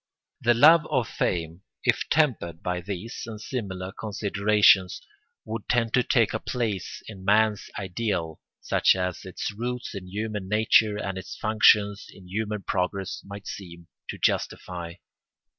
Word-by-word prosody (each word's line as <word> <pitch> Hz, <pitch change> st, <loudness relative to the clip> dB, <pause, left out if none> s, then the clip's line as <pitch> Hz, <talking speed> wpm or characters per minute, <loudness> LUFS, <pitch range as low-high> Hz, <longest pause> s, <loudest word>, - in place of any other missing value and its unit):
The 120 Hz, 0 st, +4 dB
love 155 Hz, +5 st, +7 dB
of 130 Hz, -6 st, +1 dB
fame, 85 Hz, -3 st, -2 dB, 0.2 s
if -, -, +1 dB
tempered 115 Hz, -, +1 dB
by 90 Hz, 0 st, -2 dB
these 100 Hz, +4 st, -6 dB
and 110 Hz, -2 st, -7 dB
similar 95 Hz, -6 st, -5 dB
considerations, 100 Hz, -2 st, +3 dB, 0.5 s
would 110 Hz, -1 st, -6 dB
tend 115 Hz, -2 st, +1 dB
to 125 Hz, -, +5 dB
take 115 Hz, -2 st, +2 dB
a 110 Hz, -, -1 dB
place 110 Hz, -8 st, -3 dB
in 100 Hz, -4 st, -9 dB
man's 105 Hz, +1 st, +2 dB
ideal 95 Hz, -4 st, -3 dB, 0.2 s
such -, -, +3 dB
as 90 Hz, -1 st, -3 dB
its 95 Hz, +1 st, -4 dB
roots 120 Hz, +4 st, -4 dB
in 95 Hz, -2 st, -7 dB
human 105 Hz, 0 st, -4 dB
nature 110 Hz, 0 st, +4 dB
and 95 Hz, -2 st, -3 dB
its -, -, -9 dB
functions 105 Hz, -1 st, +3 dB
in 95 Hz, -2 st, -15 dB
human 105 Hz, +1 st, -3 dB
progress 95 Hz, +1 st, -2 dB
might 100 Hz, 0 st, -9 dB
seem 85 Hz, -3 st, -9 dB, 0.2 s
to -, -, -4 dB
justify. 85 Hz, -2 st, -2 dB
100 Hz, 140 wpm, -26 LUFS, 95-110 Hz, 0.5 s, love